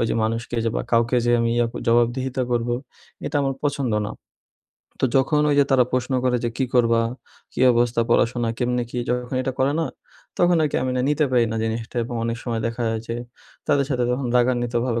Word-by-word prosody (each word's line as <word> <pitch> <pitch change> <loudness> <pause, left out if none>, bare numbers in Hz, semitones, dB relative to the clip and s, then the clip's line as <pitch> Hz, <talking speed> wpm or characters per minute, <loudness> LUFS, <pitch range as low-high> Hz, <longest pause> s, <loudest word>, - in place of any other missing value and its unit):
ওই - - +2
যে - - 0
মানুষকে 115 +2 -3
যে 115 - +1
বা - - -1
কাউকে 115 +2 +3
যে 120 - +3
আমি 115 - +1
ইয়া 120 -1 +3 0.2
জবাবদিহিতা 125 +2 +1
করবো 120 0 0 0.5
এটা 145 - -2
আমার 135 -1 0
পছন্দ 135 -5 -1
না। - - -7 0.9
তো - - +5
যখন 150 +3 +3
ওই 145 - +3
যে - - +5
তারা 130 -2 +5
প্রশ্ন 130 +1 -1
করে 125 -1 +2
যে, 120 - +1
"কী 130 - +2
করবা? 115 -1 +4 0.5
কী - - -5
অবস্থা? 120 0 +2
পড়াশোনা 120 0 +2
কেমনে 125 0 0
কী?" 125 - -4
যখন 125 +1 -2
এটা 130 - -2
করে 135 +2 +2
না? 160 - 0 0.5
তখন 175 -1 +4
আর - - +3
কি - - -1
আমি 130 - -1
না - - +1
নিতে 150 +1 +2
পারি 125 -2 +4
না - - -2
জিনিসটা 115 +2 -4
এবং 120 - -6
অনেক 115 0 -1
সময় 115 -2 -2
দেখা 115 +1 -3
যায় 110 0 -2
যে 115 - -2 0.5
তাদের 145 -2 +3
সাথে 125 -2 +1
যখন 125 +1 -1
রাগান্বিতভাবে 120 -1 +1
120 Hz, 210 wpm, -23 LUFS, 115-130 Hz, 0.9 s, তো